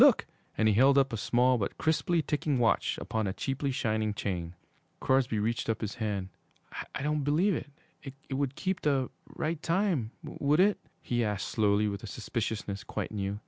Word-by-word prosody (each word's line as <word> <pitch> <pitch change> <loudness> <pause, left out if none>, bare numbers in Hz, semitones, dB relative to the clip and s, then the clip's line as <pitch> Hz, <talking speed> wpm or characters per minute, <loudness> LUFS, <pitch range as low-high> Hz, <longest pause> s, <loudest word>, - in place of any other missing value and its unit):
Look!' - - +7 0.3
And 110 - +3
he 110 - +5
held 135 +6 +5
up 135 -3 +3
a - - +1
small 125 +3 +3
but 100 - -2
crisply 160 +1 +1
ticking 145 -2 0
watch 120 -2 +2
upon 110 -2 -2
a 95 - -1
cheaply 135 +4 -2
shining 110 -4 0
chain. 90 -4 -3 0.4
Crosby 130 -4 +2
reached 115 +2 -1
up 115 - 0
his 105 -2 -2
hand. 100 -4 -2 0.7
'I - - -3
don't 150 0 0
believe 165 +8 +3
it 140 -2 -9
would 135 0 -1
keep 190 -1 -2
the 135 -4 +1 0.2
right 160 0 -2
time 170 - +1
would 145 +3 0
it?' 200 +2 +4 0.2
he 120 -1 0
asked 105 -3 -2
slowly, 105 -1 +2
with 100 -1 -3
a - - -7
suspiciousness 105 -1 -3
quite - - -4
new. 100 -1 -2
125 Hz, 180 wpm, -30 LUFS, 105-145 Hz, 0.7 s, Look